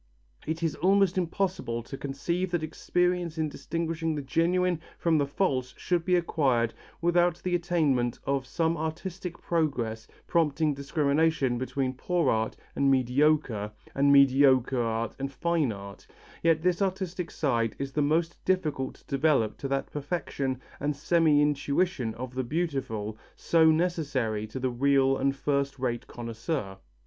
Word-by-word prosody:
It 160 +2 -2
is 160 -3 +1
almost 195 0 +3
impossible 175 -9 -1
to 135 - -8
conceive 170 +7 -2
that 175 -2 -1
experience 175 +1 0
in 155 -1 0
distinguishing 165 +2 -3
the 145 - -4
genuine 175 +4 +1 0.2
from 165 -2 +2
the 140 - +1
false 135 -6 -1
should 175 -2 -1
be 180 - +3
acquired 135 -9 +1 0.3
without 175 0 +2
the 180 - -1
attainment 155 -9 +1
of 135 -2 -1
some 165 +3 0
artistic 170 +3 -5
progress 125 -10 -1 0.2
prompting 155 -2 +1
discrimination 140 -2 +1
between 130 0 -2
poor 175 +6 +1
art 110 0 -1 0.2
and 140 - +3
mediocre, 130 -4 +2 0.2
and 140 +1 +3
mediocre 135 -2 +5
art 115 -1 -2
and 135 0 -3
fine 160 -1 0
art, 100 -1 -10 0.3
yet 165 -1 +3
this 180 +1 +1
artistic 185 -3 -2
side 115 -6 0
is 135 0 -4
the 150 - 0
most 165 +3 0
difficult 155 -8 0
to - - -22
develop 140 -6 +2
to 140 - -3
that 135 0 -2
perfection 140 -4 -3 0.2
and 145 +1 -1
semi 155 0 +3
intuition 145 -3 0
of 125 +1 -6
the 130 0 -1
beautiful, 120 -8 -3 0.2
so 160 -1 +4
necessary 145 -10 0
to 120 +5 -6
the 130 0 -1
real 135 +1 +3
and 135 +1 0
first 140 -1 -1
rate 125 -2 -2
connoisseur. 115 -3 -4
145 Hz, 145 wpm, -28 LUFS, 130-170 Hz, 0.3 s, mediocre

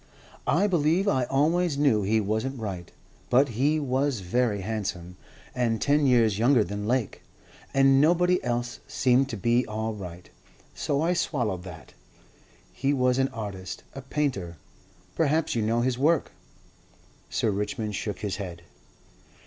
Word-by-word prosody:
"I 180 +7 +3
believe 175 +1 +2
I 130 -8 +2
always 155 +4 +1
knew 140 -7 +3
he 110 +3 +2
wasn't 110 +6 -2
right. 95 -6 -5 0.4
But 135 +3 +4
he 140 +7 +1
was 135 -3 0
very 105 +2 0
handsome. 95 -4 -4 0.4
And 115 -3 0
ten 145 0 +2
years 115 -5 +3
younger 120 0 +4
than 105 0 -5
Lake. 125 -3 -1 0.5
And 135 0 +5
nobody 180 +3 +3
else 120 0 -2
seemed 135 -2 +2
to 115 - -4
be 120 +4 +2
all 110 +1 -3
right, 90 -4 -9 0.5
so 145 +1 -1
I 175 +2 +2
swallowed 120 - -1
that. 85 -3 -11 0.8
He 135 +8 0
was 125 -1 +2
an 135 - +3
artist, 100 -6 -7
a 135 - -7
painter. 130 - -2 0.6
Perhaps 160 +1 +1
you 115 - 0
know 115 +2 +1
his 125 0 0
work." 155 +2 +2 1.0
Sir 110 - 0
Richmond 105 +2 -3
shook 105 0 -4
his 105 -3 -3
head. 90 -4 -7
120 Hz, 145 wpm, -26 LUFS, 105-140 Hz, 1.0 s, And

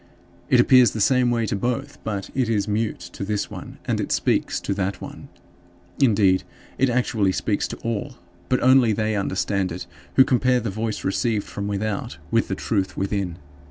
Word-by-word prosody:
It 125 - +5
appears 125 0 +6
the 110 - -4
same 125 +3 +3
way 115 -1 +1
to 105 - -1
both; 120 +4 -3
but 100 -3 -4
it 130 -3 0
is 105 -2 +1
mute 105 -1 -1
to - - -5
this 105 0 -2
one - - -8
and - - 0
it - - -4
speaks - - +1
to 100 - -2
that 95 -2 -2
one. - - -9 0.7
Indeed, 100 -7 +4 0.4
it 135 - +3
actually 115 -5 +1
speaks 100 +2 -1
to - - -7
all, 115 +4 -3 0.3
but 130 - +1
only 130 -3 +5
they 110 +1 0
understand 100 -1 -1
it 90 +1 -5 0.3
who 130 - +8
compare 125 0 +2
the 110 -3 -3
voice 110 +1 -3
received 105 +2 0
from 100 0 -5
without 100 0 -3
with - - +2
the - - -2
truth 95 -1 -2
within. 95 -3 -2
110 Hz, 185 wpm, -23 LUFS, 100-120 Hz, 0.7 s, who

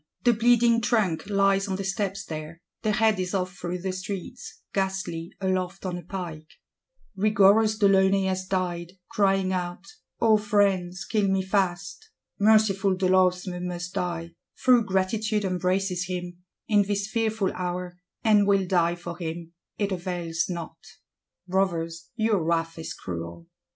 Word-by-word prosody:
The 240 - +5
bleeding 235 0 +4
trunk 205 -7 0
lies 195 0 +2
on 190 - -1
the 195 - -4
steps 195 0 -2
there; 155 +1 -7 0.2
the 215 - +1
head 220 -2 +3
is 185 +1 -2
off 185 0 -2
through 175 -1 -5
the 190 - -1
streets; 190 +5 -7
ghastly, 190 -4 -2
aloft 185 0 -2
on 180 -1 -2
a 175 - -5
pike. 170 -3 -6 0.7
Rigorous 210 +2 +4
de 205 -2 +4
Launay 195 0 +4
has 185 0 -2
died; 180 -2 -2 0.2
crying 195 -2 +2
out, 180 0 -4 0.3
'O 220 -2 +5
friends, 200 -3 +1
kill 210 -3 +1
me 190 0 +1
fast!' 190 - -1 0.3
Merciful 205 -2 +4
de 185 0 0
Losme 180 -1 +2
must 180 0 -5
die; 170 -1 -3 0.3
though 250 -2 +7
Gratitude 210 +2 0
embraces 185 0 0
him, 180 -1 -5 0.3
in 210 -2 +4
this 200 0 -1
fearful 220 -3 0
hour, 180 0 -4 0.2
and 210 -3 +4
will 195 -1 +3
die 175 -2 +2
for 175 0 -8
him; 170 0 -5 0.2
it 205 -1 -1
avails 175 -3 -2
not. 170 -2 -6 0.7
Brothers, 170 -3 -1
your 220 -6 +1
wrath 165 0 -1
is 160 - -6
cruel! 85 -1 -7
190 Hz, 145 wpm, -26 LUFS, 175-200 Hz, 0.7 s, though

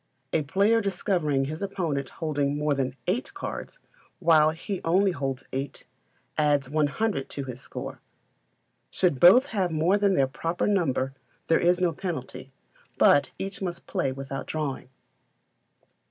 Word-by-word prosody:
A 160 - +3
player 200 +10 +2
discovering 175 -8 0
his 155 +5 -5
opponent 170 -9 -2
holding 145 -3 -1
more 150 0 +1
than 135 -2 -2
eight 230 - -1
cards, 390 - -6 0.4
while 160 -3 +5
he 170 +4 -4
only 190 +4 +3
holds 135 -4 -3
eight, 135 +1 -4 0.5
adds 145 -3 +2
100 155 +2 0
to 140 - -4
his 130 -2 -7
score. - - -7 0.9
Should 175 -8 +1
both 215 - +8
have 190 -4 +1
more 165 +5 +2
than 200 -2 +3
their 135 - +4
proper 165 +6 -2
number 140 -9 +1 0.3
there 165 - +3
is 175 +1 +3
no 175 -2 +2
penalty, 135 -7 -6 0.5
but 145 - +5
each 195 +1 -5
must 175 -2 -4
play 135 - -1
without 135 0 -6
drawing. 145 -5 -3
155 Hz, 140 wpm, -26 LUFS, 140-185 Hz, 0.9 s, both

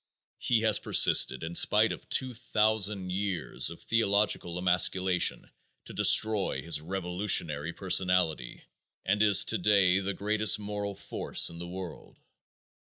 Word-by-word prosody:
He 115 -3 0
has 110 -2 +1
persisted - - +3
in 80 +1 -6
spite 105 +5 +3
of - - -10
two 130 -1 +1
thousand 105 -4 -2
years 95 -3 -2
of - - -12
theological 100 -5 -1
emasculation 90 0 +1 0.3
to - - -11
destroy 110 -3 +2
his 80 -2 -3
revolutionary 90 -3 -1
personality, 90 -7 -2 0.4
and 100 +2 0
is 105 -4 +5
today 100 -3 +2
the 100 0 -5
greatest 105 +1 +1
moral 105 -1 -6
force - - 0
in 85 - -12
the 85 - -8
world. 90 -1 -10
95 Hz, 125 wpm, -27 LUFS, 90-105 Hz, 0.4 s, is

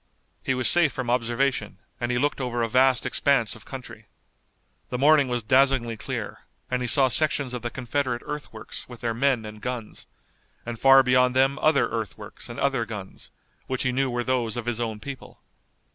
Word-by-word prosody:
He 130 - -1
was 125 -1 +2
safe 170 -4 +6
from 130 -3 -3
observation 125 +3 -1 0.2
and 120 0 -2
he 125 - 0
looked 145 +2 0
over 120 -2 -2
a - - 0
vast 130 +2 +3
expanse 130 -6 +2
of 110 - -14
country. 130 -2 -10 0.8
The 125 - -3
morning 145 +1 +5
was 120 -2 -2
dazzlingly 130 0 +2
clear, - - -5 0.3
and 125 0 0
he 125 - -2
saw 135 +3 +5
sections 140 -1 +2
of 125 - -4
the 120 - -3
Confederate 125 0 -3
earthworks 145 -8 -7
with 120 -2 -10
their 115 -1 -1
men 125 -1 +1
and 105 0 -10
guns, 125 -4 -6 0.6
and 120 -1 -6
far 135 0 +7
beyond 125 0 +3
them 135 +1 +2
other 155 -2 +3
earthworks 110 -5 -6
and - - -7
other - - +1
guns, - - -9 0.4
which 130 -1 -2
he 130 - +1
knew 135 +1 0
were 120 0 -2
those 120 -3 -1
of 120 - -4
his 120 -1 -2
own 110 -2 -3
people. 140 +3 -9
125 Hz, 190 wpm, -25 LUFS, 120-135 Hz, 0.8 s, far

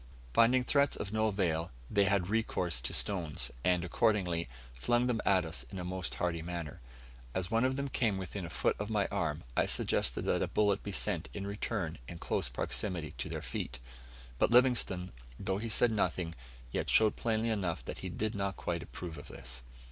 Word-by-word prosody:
Finding 125 - +5
threats 140 +2 +3
of 100 - -5
no 110 0 +3
avail, 90 -5 0 0.2
they 100 - +3
had 100 -2 +2
recourse 95 - 0
to 65 - -2
stones, 85 -7 0
and, 90 -1 +3
accordingly, 90 - +1 0.3
flung 120 - +2
them 120 -3 +1
at 95 -3 +4
us 80 -6 -4
in - - -6
a 90 - -4
most 95 0 -3
hearty 85 -2 -1
manner. 85 -2 -5 0.5
As 95 -1 -1
one 130 +5 +2
came 110 -6 +1
within 95 +1 -4
a 85 - -5
foot - - +1
of 105 +1 -3
my 105 -3 +2
arm, 75 -2 -1
I - - +3
suggested - - +1
that - - +2
a - - +1
bullet 105 -1 +2
be 100 - -5
sent - - 0
in 100 -1 -3
return 100 -4 -2
in 85 - -7
close 75 - 0
proximity 80 +5 -2
to - - -3
their - - -4
feet; 65 - -4 0.6
but - - +4
Livingstone, 120 -7 +4 0.3
though 95 0 -1
he 115 +1 -3
said 115 +2 +5
nothing, 90 -6 0 0.4
yet - - -1
showed 110 -1 +5
plainly 115 0 0
enough 95 -6 -1
that - - -5
he - - -4
did 110 +1 -2
not 100 -1 -2
quite 85 -1 -2
approve 85 -3 -7
of - - -11
this. - - -6
95 Hz, 190 wpm, -33 LUFS, 85-110 Hz, 0.6 s, Finding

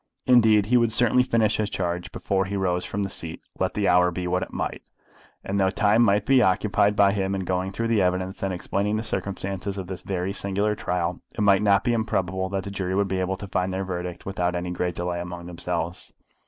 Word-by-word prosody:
Indeed 110 -5 +5
he 125 +4 +3
would 115 -2 +2
certainly 120 +2 +3
finish 110 -4 +2
his 105 -1 -1
charge 90 -1 -3
before 95 +1 -1
he 100 +2 -4
rose 90 -2 0
from 100 +1 -2
the - - -1
seat, 80 -2 -4 0.2
let - - -1
the - - +1
hour 90 0 +5
be 90 +1 -4
what 90 +1 0
it - - -5
might; - - -3 0.6
and 100 +1 -2
though 95 -1 +3
time 105 +3 +3
must 105 -2 +3
be 135 -2 +5
occupied 105 0 +2
by 100 -1 +5
him 95 -1 -1
in 95 - -2
going 95 +1 -1
through 115 +3 -2
the 110 -3 +3
evidence 95 +1 -1
and 95 - -1
explaining 100 +3 -1
the 110 - -2
circumstances 95 -1 -3
of 95 - -4
this 95 0 -7
very 95 0 -2
singular 100 +1 0
trial, 90 -3 -2 0.2
it - - -1
might 100 -1 +5
not 100 -2 +3
be 120 - +1
improbable 95 -4 -1
that 95 -1 -2
the 100 - -6
jury 95 -2 -2
would 100 0 +2
be 95 0 -1
able 95 +1 -1
to 100 - -7
find 90 0 -1
their 95 +1 -2
verdict 90 -1 -5
without 90 -2 -1
any 90 0 -3
great 90 -1 -2
delay 90 0 -2
among 85 0 -7
themselves. 85 0 -4
95 Hz, 230 wpm, -25 LUFS, 90-100 Hz, 0.6 s, Indeed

